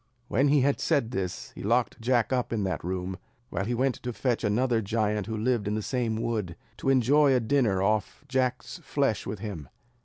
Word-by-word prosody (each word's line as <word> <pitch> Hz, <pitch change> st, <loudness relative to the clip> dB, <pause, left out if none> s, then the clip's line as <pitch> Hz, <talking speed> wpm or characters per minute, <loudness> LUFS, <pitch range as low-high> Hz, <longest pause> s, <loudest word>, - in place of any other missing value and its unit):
When 135 Hz, +6 st, +3 dB
he 145 Hz, 0 st, +4 dB
had 140 Hz, +2 st, +2 dB
said 140 Hz, -8 st, +1 dB
this, 95 Hz, -7 st, -4 dB
he -, -, -9 dB
locked 120 Hz, +3 st, +1 dB
Jack 120 Hz, 0 st, +2 dB
up 125 Hz, -2 st, 0 dB
in 110 Hz, -3 st, 0 dB
that 95 Hz, -6 st, -2 dB
room, 90 Hz, +1 st, -3 dB, 0.3 s
while 95 Hz, -, -2 dB
he 120 Hz, +3 st, -1 dB
went 130 Hz, +2 st, +2 dB
to 125 Hz, -, -3 dB
fetch 120 Hz, 0 st, -1 dB
another 115 Hz, +2 st, +2 dB
giant 105 Hz, -1 st, 0 dB
who 110 Hz, -1 st, -3 dB
lived 115 Hz, -1 st, 0 dB
in 105 Hz, -, 0 dB
the 110 Hz, -, -2 dB
same 115 Hz, -3 st, -1 dB
wood, 105 Hz, -7 st, -2 dB, 0.2 s
to -, -, -1 dB
enjoy 135 Hz, +2 st, +4 dB
a -, -, +4 dB
dinner 110 Hz, -6 st, +2 dB
off 105 Hz, +6 st, -1 dB
Jack's 130 Hz, +5 st, -1 dB
flesh 140 Hz, -8 st, -1 dB
with 105 Hz, -, -3 dB
him. 95 Hz, -, -6 dB
115 Hz, 205 wpm, -28 LUFS, 105-130 Hz, 0.3 s, he